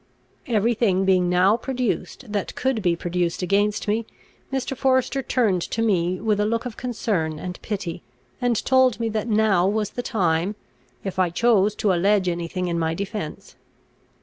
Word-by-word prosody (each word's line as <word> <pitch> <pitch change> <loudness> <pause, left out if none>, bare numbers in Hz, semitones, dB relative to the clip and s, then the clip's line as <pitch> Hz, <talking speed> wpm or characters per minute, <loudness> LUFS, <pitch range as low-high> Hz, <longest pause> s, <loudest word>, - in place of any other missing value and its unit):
Every 230 -1 +2
thing 195 -5 +1
being 185 -2 +3
now 185 +4 +4
produced 250 -2 -3
that 205 -2 -2
could 260 -4 0
be 175 -3 +2
produced 175 +1 -2
against 205 +4 +1
me, 220 +2 0 0.4
Mr. 270 0 -2
Forester 260 +1 +1
turned 220 -8 +1
to 225 - -1
me 185 -4 +1
with 215 -2 0
a 210 - +2
look 230 +2 -1
of 240 -3 -5
concern 205 -10 -2
and 180 +3 -7
pity, 195 -6 -4 0.4
and 245 -1 +2
told 260 -3 +4
me 230 -1 0
that 220 +1 -2
now 210 -5 +3
was 210 0 0
the 245 - -4
time, 185 -4 0 0.5
if 190 -1 -4
I 185 -2 +3
chose 210 +1 +3
to 200 -3 +1
allege 195 +2 +2
any 170 -1 -1
thing 180 +1 -3
in 170 -1 -1
my 160 0 0
defence. 200 -4 -6
205 Hz, 175 wpm, -23 LUFS, 180-230 Hz, 0.5 s, now